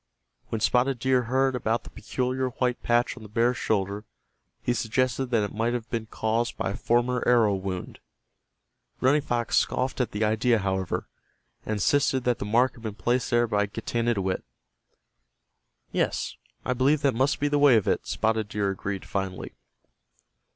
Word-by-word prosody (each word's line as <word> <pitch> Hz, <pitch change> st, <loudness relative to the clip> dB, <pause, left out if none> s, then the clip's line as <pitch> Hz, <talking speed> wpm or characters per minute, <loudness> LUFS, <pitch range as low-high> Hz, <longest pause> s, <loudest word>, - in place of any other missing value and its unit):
When 115 Hz, -, -3 dB
Spotted 125 Hz, +3 st, +2 dB
Deer 125 Hz, +1 st, +2 dB
heard 130 Hz, +2 st, +1 dB
about 115 Hz, -1 st, 0 dB
the -, -, -12 dB
peculiar 130 Hz, 0 st, -2 dB
white 125 Hz, 0 st, -1 dB
patch 120 Hz, +1 st, +1 dB
on 125 Hz, -, -12 dB
the 110 Hz, -, -11 dB
bear's 120 Hz, +3 st, +1 dB
shoulder 100 Hz, 0 st, -1 dB, 0.6 s
he 120 Hz, -, +1 dB
suggested 130 Hz, +3 st, 0 dB
that 115 Hz, -4 st, +1 dB
it 105 Hz, -, -4 dB
might 115 Hz, +3 st, 0 dB
have 115 Hz, -2 st, -4 dB
been 115 Hz, -2 st, -2 dB
caused 115 Hz, +2 st, -1 dB
by 95 Hz, -, -1 dB
a -, -, -4 dB
former 120 Hz, +1 st, +1 dB
arrow 115 Hz, -4 st, +5 dB
wound. 95 Hz, -1 st, -4 dB, 1.0 s
Running 145 Hz, +4 st, +3 dB
Fox 120 Hz, -4 st, 0 dB
scoffed 130 Hz, 0 st, 0 dB
at 120 Hz, -, 0 dB
the 105 Hz, +2 st, -2 dB
idea, 110 Hz, +2 st, +3 dB
however, 95 Hz, -2 st, -2 dB, 0.6 s
and 110 Hz, -, 0 dB
insisted 130 Hz, +5 st, +2 dB
that 125 Hz, -1 st, +1 dB
the -, -, -3 dB
mark 120 Hz, +5 st, +3 dB
had 120 Hz, -, -15 dB
been 110 Hz, -3 st, -5 dB
placed 120 Hz, +6 st, 0 dB
there 120 Hz, -1 st, +3 dB
by 105 Hz, -2 st, +1 dB
Getanittowit. 115 Hz, -3 st, -1 dB, 1.5 s
"Yes, -, -, -1 dB, 0.3 s
I 125 Hz, -, +1 dB
believe 135 Hz, +4 st, +2 dB
that 140 Hz, -2 st, +2 dB
must 130 Hz, +5 st, +1 dB
be 145 Hz, -, +1 dB
the 145 Hz, 0 st, +1 dB
way 145 Hz, -4 st, +7 dB
of 105 Hz, -, 0 dB
it," -, -, 0 dB
Spotted 110 Hz, -1 st, 0 dB
Deer 100 Hz, -3 st, 0 dB
agreed, 95 Hz, 0 st, -4 dB
finally. 95 Hz, -2 st, -4 dB
120 Hz, 170 wpm, -26 LUFS, 105-125 Hz, 1.5 s, way